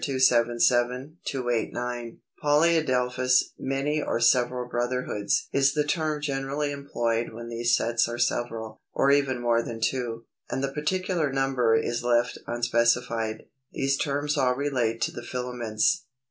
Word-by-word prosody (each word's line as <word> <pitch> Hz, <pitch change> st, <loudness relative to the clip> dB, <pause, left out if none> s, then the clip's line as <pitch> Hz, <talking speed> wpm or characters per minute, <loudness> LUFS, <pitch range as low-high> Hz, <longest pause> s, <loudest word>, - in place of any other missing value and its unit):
277, 125 Hz, +2 st, +2 dB
289). 120 Hz, -1 st, -3 dB, 0.2 s
Polyadelphous 130 Hz, -5 st, +3 dB
(many 140 Hz, +3 st, -1 dB
or -, -, -1 dB
several 125 Hz, +1 st, +2 dB
brotherhoods) 120 Hz, -4 st, -1 dB
is 140 Hz, +1 st, +3 dB
the 150 Hz, -, +2 dB
term 155 Hz, 0 st, -1 dB
generally 145 Hz, 0 st, -2 dB
employed 120 Hz, -5 st, -2 dB
when 115 Hz, +1 st, -8 dB
these 120 Hz, +1 st, +2 dB
sets 115 Hz, 0 st, +1 dB
are 120 Hz, -, -4 dB
several, 115 Hz, -2 st, -2 dB
or 140 Hz, -, +4 dB
even 140 Hz, -3 st, +2 dB
more 120 Hz, -1 st, +2 dB
than 115 Hz, -1 st, -6 dB
two, 115 Hz, -1 st, -2 dB, 0.2 s
and 135 Hz, -, -2 dB
the 135 Hz, 0 st, -2 dB
particular 165 Hz, 0 st, -1 dB
number 135 Hz, -4 st, +2 dB
is 120 Hz, +1 st, -1 dB
left 120 Hz, 0 st, +1 dB
unspecified. 120 Hz, -1 st, 0 dB, 0.3 s
These 135 Hz, 0 st, +1 dB
terms 145 Hz, +1 st, -1 dB
all 125 Hz, -1 st, +2 dB
relate 125 Hz, -5 st, -1 dB
to -, -, +1 dB
the -, -, -7 dB
filaments. 120 Hz, -3 st, -1 dB
125 Hz, 130 wpm, -26 LUFS, 120-140 Hz, 0.3 s, or